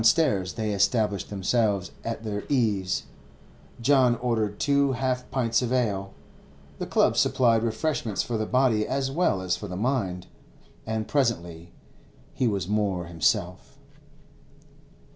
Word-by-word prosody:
Downstairs 110 - +3
they 110 -2 -2
established 100 0 +1
themselves 100 -1 0
at 115 -1 -4
their 105 -2 -3
ease. 105 -9 +1 0.8
John 125 -1 +4
ordered 110 -4 -1
two 140 -1 +2
half 130 -1 -2
pints 120 -3 +1
of 125 -1 -2
ale—the 100 -6 -4
club - - +3
supplied 115 -3 +3
refreshment 115 -1 -2
for 120 - -1
the 110 -1 -1
body 125 -5 +2
as 135 0 -1
well 135 - +1
as 90 -1 0
for 105 - -7
the 90 -1 -6
mind—and 110 0 -4
presently 85 - -1 0.6
he 125 - 0
was 100 -5 -1
more 100 -4 0
himself. 85 -1 -1
110 Hz, 125 wpm, -26 LUFS, 100-125 Hz, 0.8 s, John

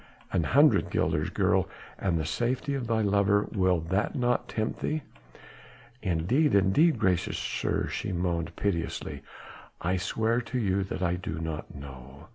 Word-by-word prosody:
"An - - +1
hundred - - +4
guilders, - - 0
girl, - - +1 0.3
and 90 -4 +1
the 80 - -1
safety 125 - -1
of 130 -4 -3
thy 110 -1 +1
lover. 100 0 +3
Will 95 -4 +2
that 95 +6 -1
not 125 -1 +1
tempt 110 0 -2
thee?" 155 -1 -2 1.0
"Indeed, 100 - +2
indeed, 110 - +4
gracious 95 -5 +1
sir," - - -1
she - - -3
moaned 85 -2 -2
piteously, 85 -5 -2 0.6
"I 90 +2 0
swear 115 +6 0
to 125 +2 -4
you 100 -4 +1
that 95 - -4
I 90 0 +1
do 80 -3 -5
not 80 -2 -5
know." 70 +2 -11
95 Hz, 150 wpm, -28 LUFS, 85-115 Hz, 1.0 s, hundred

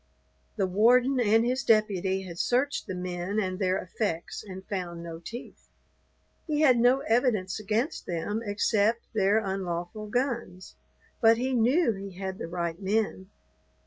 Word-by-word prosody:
The 195 - +1
warden 245 +7 +4
and 225 0 +4
his 255 +2 0
deputy 195 -4 +2
had 175 -2 -8
searched 265 +4 0
the 190 - -4
men 180 +3 -3
and 185 -2 -2
their 185 -1 +1
effects 175 -3 -3
and 190 -2 -9
found 175 -4 -4
no 165 -1 -7
teeth. 235 +8 -10 0.8
He 305 -1 0
had 255 -6 +5
no 250 +3 +4
evidence 225 -7 +1
against 220 - -2
them 180 +6 -2
except 215 +2 +1
their 205 0 +3
unlawful 190 0 -3
guns, 235 -6 -3 0.5
but 225 0 +6
he 260 +2 -1
knew 250 +5 +3
he 195 -1 -8
had 190 0 -5
the - - -4
right 170 +1 -3
men. 195 -1 -1
205 Hz, 145 wpm, -28 LUFS, 185-235 Hz, 0.8 s, but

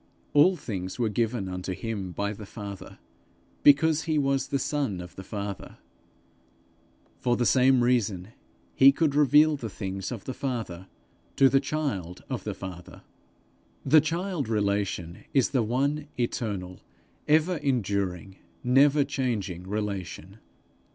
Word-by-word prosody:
All 150 +6 +6
things 95 - -5
were 120 -3 +1
given 110 -1 -1
unto 90 0 -4
him 100 -2 -4
by 100 +3 -2
the 105 -1 -10
Father, 100 -3 -8 0.6
because 150 +2 +5
he 155 -2 0
was 135 -1 +1
the 140 - 0
Son 135 -8 -2
of 90 0 -9
the 95 - -8
Father: 100 -1 -6 1.4
for 120 -1 +1
the 120 - +1
same 130 0 +4
reason 110 -6 +1 0.4
he 135 +1 +7
could 145 0 +1
reveal 150 +1 +5
the 120 -6 -6
things 95 0 -5
of 115 -6 -6
the 130 - -4
Father 110 -10 -4 0.5
to 135 -1 +6
the 135 - +4
child 135 - -3
of - - -4
the - - -3
Father. 90 -2 -9 0.8
The 155 -1 +6
child 165 - -2
relation 100 -5 -1
is 135 -4 +3
the 130 -3 +2
one 140 +6 -1
eternal, 100 -7 -3 0.5
ever 160 +4 +3
enduring, 100 - -2 0.3
never 140 +3 +5
changing 110 - -3
relation. 100 -2 -4
115 Hz, 135 wpm, -27 LUFS, 95-140 Hz, 1.4 s, he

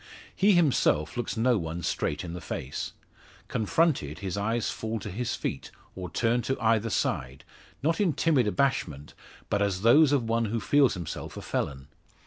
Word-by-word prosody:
He 200 +1 +4
himself 130 - +2
looks 120 -2 -3
no 120 0 +3
one 85 +1 -5
straight 75 -1 -1
in 85 -2 -6
the 90 - -6
face. 65 -4 -5 0.5
Confronted, 110 - +1
his 95 0 -4
eyes 110 +3 -1
fall 110 0 -3
to 105 -1 -6
his 120 +5 -2
feet, - - -4 0.3
or 90 -2 -6
turn 120 +1 +1
to 135 +2 -2
either 115 0 +2
side, 65 - -2 0.4
not 165 +6 +1
in 180 -6 +2
timid 140 -9 +2
abashment, 95 - -1 0.3
but 100 - 0
as 100 -1 0
those 140 +6 +6
of 140 -4 +2
one 115 0 +1
who 115 +2 -1
feels 135 +4 +3
himself 85 -4 -6
a - - -5
felon. 65 0 -3
110 Hz, 170 wpm, -28 LUFS, 90-130 Hz, 0.5 s, those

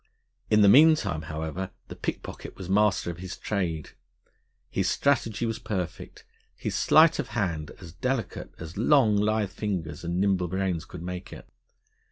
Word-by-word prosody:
In 105 -1 +5
the - - +7
meantime, 125 - +5
however, 80 +4 -4 0.2
the - - -8
pickpocket - - -6
was 95 - -7
master 100 -2 +2
of 85 - -10
his 95 0 -7
trade. 85 -7 -2 0.8
His - - 0
strategy 120 -5 +1
was 115 -1 -2
perfect, 105 -6 -5 0.3
his - - -4
sleight 160 0 +5
of 140 - -1
hand 85 -7 -1
as 85 -4 -11
delicate 125 +3 -3
as 80 +2 -9
long, 120 -2 +4
lithe 105 -1 +1
fingers 85 -9 -4
and 85 +1 -2
nimble 95 -2 +2
brains 95 -2 -2
could 85 -2 -9
make 90 +1 -6
it. - - -10
95 Hz, 155 wpm, -27 LUFS, 85-110 Hz, 0.8 s, the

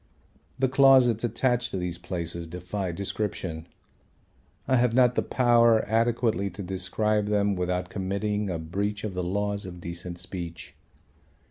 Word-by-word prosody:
The 130 - +2
closets 130 -4 +5
attached 120 +1 +1
to - - -4
these 90 -1 -3
places 85 -1 -4
defy 90 +2 -4
description. 90 -3 -4 1.0
I 130 - +3
have 120 -1 +2
not 125 -1 +5
the - - +1
power 120 -3 +4
adequately 115 -2 +1
to 95 +2 -8
describe 100 +3 0
them 100 -1 +1
without 90 0 -2
committing 100 +2 -2
a 90 - -2
breach 100 +6 -3
of 105 -3 -3
the 90 0 -2
laws 100 +2 -2
of 90 -1 -9
decent 85 +1 -6
speech. 85 -2 -6
100 Hz, 140 wpm, -27 LUFS, 90-115 Hz, 1.0 s, closets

